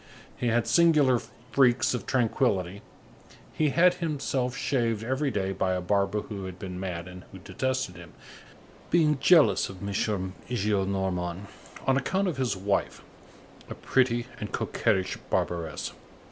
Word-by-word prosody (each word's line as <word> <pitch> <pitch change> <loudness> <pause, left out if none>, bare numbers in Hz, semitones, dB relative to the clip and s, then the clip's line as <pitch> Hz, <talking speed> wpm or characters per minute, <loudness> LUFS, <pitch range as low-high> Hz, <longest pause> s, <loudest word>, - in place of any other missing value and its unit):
He 125 - -2
had 115 0 +2
singular 150 -8 +4 0.3
freaks 125 -3 +3
of 125 - -4
tranquillity; 105 -6 0 0.7
he 155 -1 +1
had 180 +5 +5
himself 140 -7 -2
shaved 115 -5 0
every 130 +4 0
day 95 -5 -1
by 95 0 0
a 90 - 0
barber 100 +3 +1
who 100 -3 -7
had 95 -1 -7
been 90 -1 -6
mad 90 -2 -4
and 90 0 -10
who - - -10
detested 130 -1 -3
him, 85 -1 -12 0.8
being 155 -4 +3
jealous 145 - +5
of 95 +1 -7
M. 100 - -3
Gillenormand 95 -2 -2 0.4
on 135 0 +3
account 190 +9 0
of 170 -6 -2
his 125 -7 0
wife, 100 +1 -1 0.7
a - - -6
pretty 120 -2 +1
and - - -5
coquettish 95 -1 0
barberess. 85 -3 -2
105 Hz, 140 wpm, -27 LUFS, 95-130 Hz, 0.8 s, had